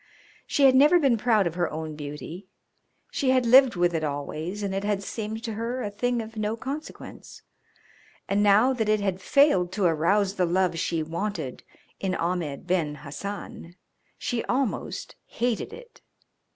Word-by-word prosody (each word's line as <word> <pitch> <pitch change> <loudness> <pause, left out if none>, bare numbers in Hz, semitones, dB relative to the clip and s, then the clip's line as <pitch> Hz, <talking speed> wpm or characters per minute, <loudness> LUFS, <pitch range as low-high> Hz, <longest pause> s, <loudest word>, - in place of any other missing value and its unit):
She 285 - +1
had 265 -1 +7
never 295 +6 +6
been 275 -7 +3
proud 220 -3 +2
of 170 - -1
her 175 0 0
own 155 0 -5
beauty; 150 +5 -8 0.6
she 270 - 0
had 255 -1 +3
lived 255 0 +6
with 175 0 +2
it 160 -1 -1
always 155 +7 -4
and 195 -1 -2
it 195 +1 -2
had 205 -1 -1
seemed 220 +2 -5
to 225 -2 -3
her 235 +4 -3
a 205 - -3
thing 240 +2 -1
of 225 +1 -11
no 215 +1 -2
consequence, 280 +6 -8 0.8
and 200 +1 +1
now 210 +6 +5
that 220 -4 -1
it 215 0 +3
had 190 -2 -2
failed 190 -9 +3
to 200 - -1
arouse 190 +5 +2
the 180 - +3
love 180 -1 +1
she 165 -2 -1
wanted 165 -4 -4 0.4
in 190 -1 -1
Ahmed 170 -5 -2
Ben 170 -5 0
Hassan 175 +2 -7 0.4
she 235 -2 -2
almost 255 -2 -2
hated 240 - -2
it. 475 +1 -13
205 Hz, 165 wpm, -26 LUFS, 175-235 Hz, 0.8 s, had